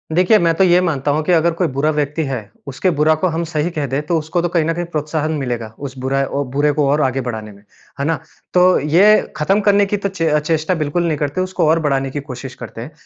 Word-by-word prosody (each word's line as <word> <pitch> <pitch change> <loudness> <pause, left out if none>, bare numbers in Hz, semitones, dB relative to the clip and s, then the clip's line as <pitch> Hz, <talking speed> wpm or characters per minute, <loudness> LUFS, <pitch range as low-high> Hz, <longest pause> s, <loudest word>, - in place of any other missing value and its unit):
देखिए 185 +5 +5
मैं 170 -1 +2
तो 190 - +3
ये 180 -1 +5
मानता 150 -5 0
हूँ 155 +2 0
कि 180 - +1
अगर 170 0 +3
कोई 170 +1 0
बुरा 150 +3 +2
व्यक्ति 150 +1 -1
है 135 -2 -2 0.3
उसके 140 +7 -1
बुरा 155 +1 +4
को - - +4
हम 165 0 -2
सही 160 0 -2
कह 145 - 0
दें 135 +3 -1
तो 170 - +1
उसको 160 +3 -2
तो 175 - -1
कहीं 165 -2 +1
न 165 - 0
कहीं 175 +1 -3
प्रोत्साहन 155 0 -2
मिलेगा। 120 -5 -3
उस 135 -2 -7
बुरा 135 +1 +1
ओ 140 +1 -2
बुरे 145 +2 +2
को 145 -1 +1
और 150 +1 +2
आगे 135 -1 0
बढ़ाने 110 -4 -5
में। 100 0 -17 0.4
है 140 - -1
ना? 165 +2 +1 0.4
तो 180 0 +5
ये 180 +9 +5 0.2
ख़त्म 190 +7 +2
करने 205 0 +4
की 205 +1 -1
तो 200 0 -2
चे 170 -4 -2
अ, 150 0 +3
चेष्टा 160 +3 0
बिल्कुल 155 +2 -1
नहीं 155 -2 0
करते 145 +4 -2
उसको 185 -3 0
और 165 +1 +3
बढ़ाने 135 -3 0
की 145 - -3
कोशिश 130 -1 -8
करते 115 -2 -9
हैं। 125 - -8
155 Hz, 260 wpm, -18 LUFS, 140-175 Hz, 0.4 s, देखिए